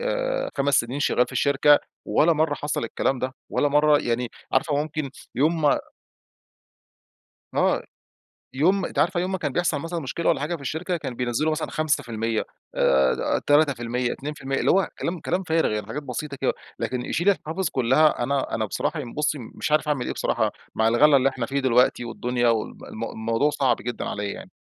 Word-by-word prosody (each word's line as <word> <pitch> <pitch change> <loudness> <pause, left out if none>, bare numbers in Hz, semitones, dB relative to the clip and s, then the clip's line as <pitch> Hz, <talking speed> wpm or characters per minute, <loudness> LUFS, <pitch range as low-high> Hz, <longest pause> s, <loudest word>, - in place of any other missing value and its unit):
آآ - - -1
5 140 0 +2
سنين 125 +4 0
شغّال 125 -3 +2
في - - -12
الشركة، 145 +1 +4 0.3
ولا 170 +3 +3
مرّة 155 -1 +1
حصل 145 -4 -2
الكلام 130 +3 -1
ده، 130 +1 -2 0.2
ولا 145 - +2
مرّة 150 +1 +4
يعني 120 -2 -1 0.2
عارفة 145 +3 +2
ممكن 150 -1 -2 0.3
يوم 160 +5 +2
ما 145 - +4 1.8
آه. - - +2 0.7
يوم 185 +6 +3
أنتِ - - -5
عارفة 180 -3 +2
يوم 185 +2 -2
ما 190 - -1
كان 145 -5 -2
بيحصل 170 -2 0
مثلًا 165 +2 -4
مشكلة 160 +4 -2
والّا - - +2
حاجة 160 +4 -2
في - - -17
الشركة، 165 +6 -2
كان 140 -6 -5
بينزّلوا 125 +5 0
مثلًا 155 0 -2
5%، 115 -8 -1 0.3
آآ 65 0 +2
3%، 125 -5 +2
2%، 135 -1 -4
اللي - - +2
هو 195 0 +3
كلام 170 0 -2
كلام 180 +3 -1
فارغ، 165 -5 +1
يعني 105 -1 -3
حاجات 145 +8 -5
بسيطة 140 +2 -5
كده. - - +2 0.3
لكن 125 -1 -2
يشيل 175 +8 0
الحوافز 185 -1 -2
كلّها 130 +3 +3
أنا 140 +2 -1
أنا 110 - 0
بصراحة 150 - -2
ين 120 -5 -8
بُصّي 150 0 0 0.2
مش - - -3
عارف 155 0 +2
اعمل 140 -5 0
إيه - - -2
بصراحة - - 0 0.2
مع 110 0 +3
الغلا 140 +6 +5
اللي 135 0 +4
إحنا 130 -3 -3
فيه 140 +2 -1
دلوقتي، 125 -1 +3
والدنيا 120 +1 -1
وال 115 -2 +1 0.3
م - - -3
الموضوع 115 +6 0
صعب 135 -5 +2
جدًا 120 0 -5
عليّا 105 0 -3
يعني. - - -10
145 Hz, 185 wpm, -24 LUFS, 125-155 Hz, 1.8 s, الغلا